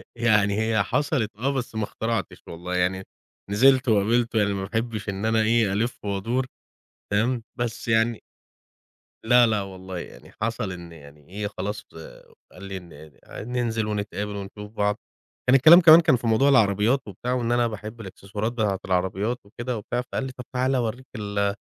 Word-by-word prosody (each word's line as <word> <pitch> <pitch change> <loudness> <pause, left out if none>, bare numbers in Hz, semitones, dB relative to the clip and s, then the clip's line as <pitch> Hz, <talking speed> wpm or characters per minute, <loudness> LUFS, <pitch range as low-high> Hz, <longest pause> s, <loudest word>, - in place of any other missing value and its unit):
يعني 105 -3 +2
هي 110 -2 +2
حصَلِت 140 -3 0
آه 135 +4 0
بس 125 -4 -4
ما 110 - -1
اخترعتش 110 0 -3
والله، 90 +2 -5
يعني، 90 +1 0 0.5
نزِلت 130 +5 +4
وقابلته 115 +2 +2
يعني 100 -1 +2
ما 100 -1 -3
باحبش 110 0 -3
إن 100 +2 -3
أنا 110 0 +2
إيه، 110 -2 +2
ألِف 115 +2 -2
وأدُور. 115 +6 -1 0.7
فاهم، 115 +4 +1 0.2
بس 120 -1 -3
يعني 115 0 +2 1.0
لا، 120 +1 +6
لا 110 -2 +1
والله، 95 -2 -7
يعني - - -11
حصَل 115 -2 -2
إن 85 -2 -9
يعني 75 -1 -15
إيه، 105 +2 -4
خلاص 105 +1 -5
آآ 80 - -13 0.2
قال 90 - -13
لي 95 -1 -5
إن 80 -4 -13 0.4
ننزِل 115 -3 -1
ونتقابل 105 -1 -3
ونشوف 105 +1 -8
بعض، 105 -1 0 0.5
كان 125 - +6
الكلام 160 +7 +9
كمان 165 -1 +9
كان 160 -4 +4
في 120 -1 -3
موضوع 115 +5 +4
العربيّات 110 0 +3
وبتاع 110 +5 -4
وإن 120 -2 -1
أنا 120 0 +3
باحب 110 +1 -7
الإكسسوارات 100 +2 -5
بتاعة 105 -5 -1
العربيات 95 +6 0
وكدة 120 +4 -5
وبتاع، 120 +4 -3
فقال 125 - -4
لي 135 - -4
طَب 125 -1 -10
تعالى 130 +1 +1
أورّيك 120 +1 -3
ال 100 -2 -1
110 Hz, 170 wpm, -24 LUFS, 100-120 Hz, 1.0 s, الكلام